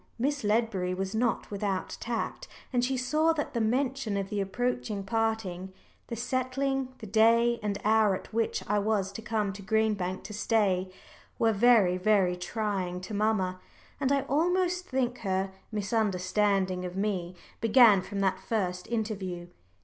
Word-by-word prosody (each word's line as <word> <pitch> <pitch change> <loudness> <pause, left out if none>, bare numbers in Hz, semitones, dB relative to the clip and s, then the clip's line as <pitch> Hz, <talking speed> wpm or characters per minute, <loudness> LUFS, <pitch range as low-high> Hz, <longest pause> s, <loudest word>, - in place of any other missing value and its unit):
Miss 280 +3 -1
Ledbury 210 -4 +1
was 190 +1 -3
not 230 0 0
without 200 -2 -2
tact, 240 - -3 0.3
and 245 -1 +2
she 260 +1 0
saw 305 +6 +2
that 295 -2 -3
the 235 - 0
mention 250 -1 0
of 195 -1 -3
the 205 -1 0
approaching 215 0 -2
parting, 205 -4 -2 0.4
the 235 - -4
settling 255 +2 -1
the - - -9
day 230 +3 +4
and 205 -1 -2
hour 215 -2 +4
at 185 - -10
which 225 0 0
I 210 +1 +2
was 200 -2 0
to 200 - -7
come 215 -2 -1
to 200 - -9
Green 220 +2 +2
Bank 185 -2 -4
to 210 - -8
stay, 200 -4 +1 0.5
were 225 -1 +3
very, 205 -4 +5
very 190 -2 +3
trying 185 -1 -2
to 200 +4 -7
mamma. 200 -3 0 0.4
And 275 -1 +1
I 280 -1 +3
almost 360 +5 +1
think 250 -2 -1
her 190 -2 -1 0.2
misunderstanding 195 -2 0
of 180 0 -5
me 190 -3 -2 0.2
began 225 -3 +6
from 195 +2 -4
that 190 -1 +1
first 185 -3 -2
interview. 195 -6 -3
215 Hz, 155 wpm, -29 LUFS, 190-235 Hz, 0.5 s, began